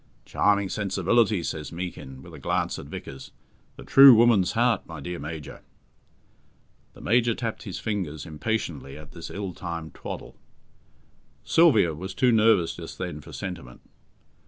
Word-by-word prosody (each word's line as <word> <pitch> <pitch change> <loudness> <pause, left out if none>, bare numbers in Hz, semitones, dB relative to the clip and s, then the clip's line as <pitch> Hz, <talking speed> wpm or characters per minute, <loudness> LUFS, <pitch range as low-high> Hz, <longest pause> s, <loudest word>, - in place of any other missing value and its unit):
"Charming 100 -1 +2
sensibility!" 100 0 +1
says 75 -3 -5
Meekin, 85 -7 -7
with 85 - -13
a 80 - -10
glance - - -1
at - - -9
Vickers. 65 -1 -9 0.5
"The - - -11
true 135 -2 +9
woman's 110 -5 +4
heart, 120 +1 +1
my 80 -2 -8
dear 90 +4 -6
Major." 75 +1 -7 1.3
The - - -14
Major 120 +1 +2
tapped 115 -3 -4
his 95 - -5
fingers 90 -9 -4
impatiently 75 -4 -4
at 75 -1 -12
this 85 - -9
ill 100 -2 -5
timed 85 -4 -6
twaddle. - - -8 1.1
Sylvia 110 - +4
was 95 +5 -7
too 125 -1 +3
nervous 110 -6 +3
just 85 -2 -9
then 90 -5 -5
for - - -13
sentiment. 85 -11 -7
90 Hz, 145 wpm, -25 LUFS, 80-110 Hz, 1.3 s, true